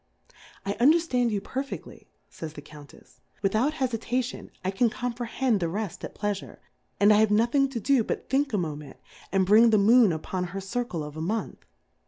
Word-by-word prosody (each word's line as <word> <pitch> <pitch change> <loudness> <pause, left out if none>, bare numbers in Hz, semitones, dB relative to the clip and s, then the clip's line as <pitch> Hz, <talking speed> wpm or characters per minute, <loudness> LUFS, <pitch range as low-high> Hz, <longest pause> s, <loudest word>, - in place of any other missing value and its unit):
I 200 - -1
underfland 265 -3 +3
you 205 -3 -1
perfeftly, 270 +5 -6 0.2
fays 160 -2 -8
the 145 - -9
Cotmtefs^ 145 -1 -15 0.2
without 220 +9 +2
Hefitation, 250 -1 -2 0.2
I 190 - +1
can 230 +5 +2
comprehend 245 -1 -1
the 170 -2 -1
reft 200 0 -4
at - - -7
Pleafure, 205 -2 -4 0.4
and 205 +2 +6
I - - +5
have 220 0 +4
nothing 240 +6 +3
to 255 -3 -4
do 260 +1 +2
but - - -4
thiiik 275 +1 +1
a 210 - 0
Mo 160 -5 -2
ment, 145 -2 -11 0.3
and 190 -1 +2
bring 220 +4 +6
the 220 - +4
Moon 220 +1 +6
upon 180 +3 -3
her 185 +2 -5
Circle 195 -4 -3
of 150 +1 -8
a - - -4
Month. 215 +7 -3
215 Hz, 185 wpm, -26 LUFS, 190-245 Hz, 0.4 s, and